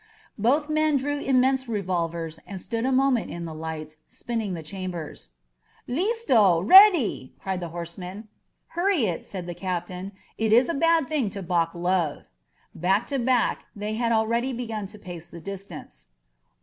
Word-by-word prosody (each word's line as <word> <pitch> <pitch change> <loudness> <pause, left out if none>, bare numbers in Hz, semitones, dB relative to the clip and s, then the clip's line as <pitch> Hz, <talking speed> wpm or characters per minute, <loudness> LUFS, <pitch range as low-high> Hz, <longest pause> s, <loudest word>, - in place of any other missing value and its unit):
..." - - -29
Both 280 +8 +2
men 310 -1 +2
drew 290 +2 -2
immense 265 -1 +2
revolvers 170 -6 -2
and 195 -2 -6
stood 230 +5 -2
a - - +1
mo* 270 +1 +4
ment 240 -3 0
in 170 0 -5
the 160 - -6
light, 155 -1 -6
spinning 225 -6 -4
the 165 - -7
chambers. 175 - -6 0.6
L%sto! 255 - +3
Ready!" 310 - +6
cried 190 -1 -3
the 175 - -4
horseman. 180 +5 -7 0.4
"Hurry 350 - +1
it," 175 -5 -2
said 185 -3 -7
the 175 - -5
captain. 180 +1 -4 0.3
"It 220 -1 +1
is 245 +5 +5
a - - +1
bad 330 -1 +3
thing 285 -9 0
to 195 0 -7
balk 170 -1 0
love." 175 -3 0 0.5
Back 190 +6 +1
to 275 - +1
back, 245 -1 +1
they 210 +1 -4
had 230 +1 0
already 230 +3 +1
begun 225 -4 -4
to 210 - -12
pace 175 -4 -9
the 170 - -10
distance. 185 - -9
205 Hz, 165 wpm, -25 LUFS, 175-255 Hz, 0.6 s, Ready